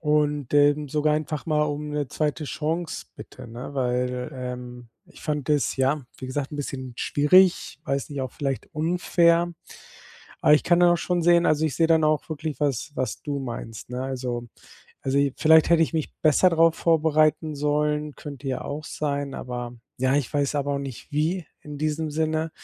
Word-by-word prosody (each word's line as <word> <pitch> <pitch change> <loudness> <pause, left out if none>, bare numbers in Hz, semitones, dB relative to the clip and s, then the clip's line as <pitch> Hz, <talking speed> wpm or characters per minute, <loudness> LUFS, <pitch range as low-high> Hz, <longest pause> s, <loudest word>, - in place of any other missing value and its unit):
und, 150 -3 +1
ähm, 145 0 +4
sogar 150 +1 +1
einfach 155 0 -3
mal 150 -1 +2
um 150 0 -3
'ne 150 -3 -2
2. 150 0 -2
Chance 160 +3 -3
bitte, - - -11
ne? 125 +5 -8
Weil, 125 -1 -1
ähm, 125 -1 -7 0.2
ich - - -16
fand 150 -3 -2
das 150 -2 +1
ja, 135 +2 +1 0.2
wie 130 - -6
gesagt, 135 +1 -3
'n - - -5
bisschen 130 -3 -5
schwierig, 175 0 +3
weiß 140 0 -2
nicht, 140 -2 -4
auch 130 - -5
vielleicht 135 -3 -3
unfair. 170 +1 +2 0.9
Aber - - +5
ich 150 - +2
kann 175 0 +4
dann 175 0 +6
auch 175 - +4
schon 175 -1 -1
sehen 175 0 +5
also, 155 0 +2
ich 140 - -3
sehe 165 - +4
dann 160 -1 +4
auch 155 -1 +1
wirklich 155 -1 -4
was 140 -2 -1
was 130 0 -3
du 145 -2 -3
meinst, 115 -3 -7
ne? 125 +1 -3
Also, 125 -2 -4 0.5
also, 135 +1 -1
i 140 -1 +2
vielleicht 160 +1 +5
hätte 165 -1 +6
ich - - -7
mich 160 -2 -2
besser 155 +4 +5
darauf 165 -1 +4
vorbereiten 155 -1 +2
sollen, 150 0 0
könnte 140 -2 -7
ja 130 - -2
auch 150 +2 -5
sein, 145 -2 -3
aber 120 -1 -5 0.2
ja, 130 +1 +2
ich 140 -5 -1
weiß 145 0 +1
aber 145 0 0
auch - - -1
nicht 135 +2 -8
wie 160 +3 0 0.2
in 150 -1 -8
diesem 155 +1 -1
Sinne. 160 +1 -1
150 Hz, 190 wpm, -25 LUFS, 135-155 Hz, 0.9 s, dann